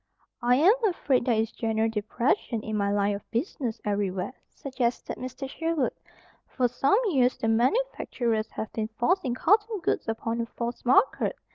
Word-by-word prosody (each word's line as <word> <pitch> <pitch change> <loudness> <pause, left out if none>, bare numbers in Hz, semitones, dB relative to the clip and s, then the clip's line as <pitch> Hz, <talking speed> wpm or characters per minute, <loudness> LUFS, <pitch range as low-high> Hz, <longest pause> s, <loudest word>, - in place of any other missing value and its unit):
"I 245 +1 +4
am 335 +10 +6
afraid 280 - +1
there 240 - +3
is 220 0 0
general 225 -1 0
depression 225 - -1
in 215 - -3
my 200 -1 +1
line 205 0 +1
of 200 - -10
business 240 - -2
everywhere," 200 +1 -1 0.2
suggested 255 -3 -3
Mr. 255 +2 -6
Sherwood. 325 -1 -1 0.5
"For 255 -2 +1
some 270 - +2
years 255 -6 +2
the 225 - -2
manufacturers 235 - 0
have 220 - -5
been 220 -1 -2
forcing 270 -3 +1
cotton 420 - +2
goods - - -1
upon 225 +1 -2
a 230 - -3
false 235 +1 -5
market. 260 - +3
240 Hz, 155 wpm, -27 LUFS, 220-275 Hz, 0.5 s, am